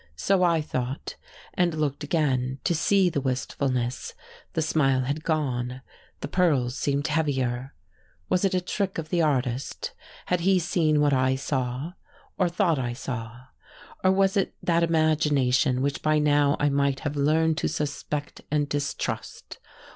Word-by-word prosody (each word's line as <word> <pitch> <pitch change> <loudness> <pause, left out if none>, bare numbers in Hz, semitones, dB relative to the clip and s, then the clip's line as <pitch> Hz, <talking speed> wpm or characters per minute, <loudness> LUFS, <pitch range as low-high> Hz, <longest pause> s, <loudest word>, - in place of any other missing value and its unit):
So 190 - +1
I 170 -3 +3
thought, 130 -2 -4 0.4
and 175 -3 +1
looked 145 -2 -1
again 135 -4 0
to - - +1
see 190 +4 +3
the 150 -5 -1
wistfulness: 130 -1 -2 0.4
the 160 - 0
smile 135 -4 +2
had 140 +4 -3
gone, 130 -5 -1 0.4
the - - -3
pearls 145 -8 +1
seemed 140 0 -1
heavier. 135 -5 -1 0.5
Was 180 - +1
it 195 -1 +2
a 180 - +1
trick 195 +2 -2
of 160 -1 -4
the 175 -1 +1
artist? 130 -4 -1 0.3
had 180 - +1
he 190 +2 +3
seen 160 -3 +2
what 145 -1 +3
I 130 0 +2
saw, 130 +3 -3 0.4
or 180 -2 +1
thought 170 -4 +1
I 120 -2 -2
saw? 120 -2 -6 0.6
or 185 - +5
was 195 +1 +2
it 195 - 0
that 170 -1 +2
imagination 150 -5 +2
which 140 0 -1
by 155 0 +2
now 145 -1 +3
I 145 - +3
might 140 -1 +1
have 145 -1 -3
learned 155 +2 +2
to - - 0
suspect 145 0 -4
and 150 -1 +1
distrust. 145 0 -4
145 Hz, 155 wpm, -26 LUFS, 130-165 Hz, 0.6 s, or